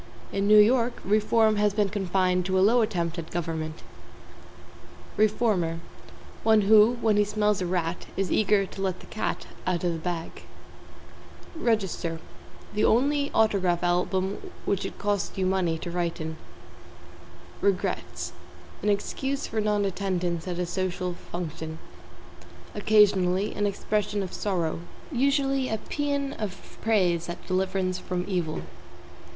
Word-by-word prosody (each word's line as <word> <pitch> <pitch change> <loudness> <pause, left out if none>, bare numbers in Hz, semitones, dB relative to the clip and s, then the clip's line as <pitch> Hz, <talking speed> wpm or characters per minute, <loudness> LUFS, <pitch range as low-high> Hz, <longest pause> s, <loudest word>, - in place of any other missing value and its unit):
In 200 0 0
New 210 0 +7
York, 235 +3 +4
reform 215 +1 +3
has 205 -1 +2
been 205 -2 +2
confined 185 -2 +1
to 190 0 +1
a 190 - +5
Low 240 +2 +4
attempt 170 -5 -1
at 165 - -7
government. 160 -2 -4 1.3
=REFORMER= 205 -6 +2 0.6
One 220 -1 +5
who, 215 +3 +6
when 215 -2 +3
he 210 - +5
smells 210 -1 +1
a 180 - -1
rat, 175 -1 -2
is 195 -1 0
eager 205 -1 +3
to 195 - -8
let 190 -2 -1
the - - -13
cat 215 - -3 0.2
out 180 -1 0
of 175 -1 +1
the 165 - -4
bag. 170 0 -4 1.1
=REGISTER= 200 - -1 0.5
The 210 - 0
only 285 +4 +3
autograph 185 -6 +2
album 185 +2 0
which 200 - 0
it - - -10
costs 205 -1 -1
you 190 - +1
money 185 -3 +1
to 170 +2 -6
write 175 0 -2
in. 160 0 -5 1.2
=REGRETS= 200 -2 -1 0.5
An 210 - +1
excuse 265 +7 -1
for 220 - -2
non 210 -1 +1
attendance 180 -3 -2
at 175 -1 -3
a 180 - 0
social 180 0 -2
function. 160 -2 -6 1.0
Occasionally, 205 -2 +3
an 205 0 0
expression 205 0 -1
of 185 - -7
sorrow; 175 -6 -1 0.3
usually, 275 0 +1
a 220 - 0
paean 280 +2 -2
of 200 -3 -7
praise 180 -6 +2
at 175 - -7
deliverance 185 0 0
from 180 0 -3
evil. 175 -5 -2
195 Hz, 140 wpm, -27 LUFS, 175-215 Hz, 1.3 s, New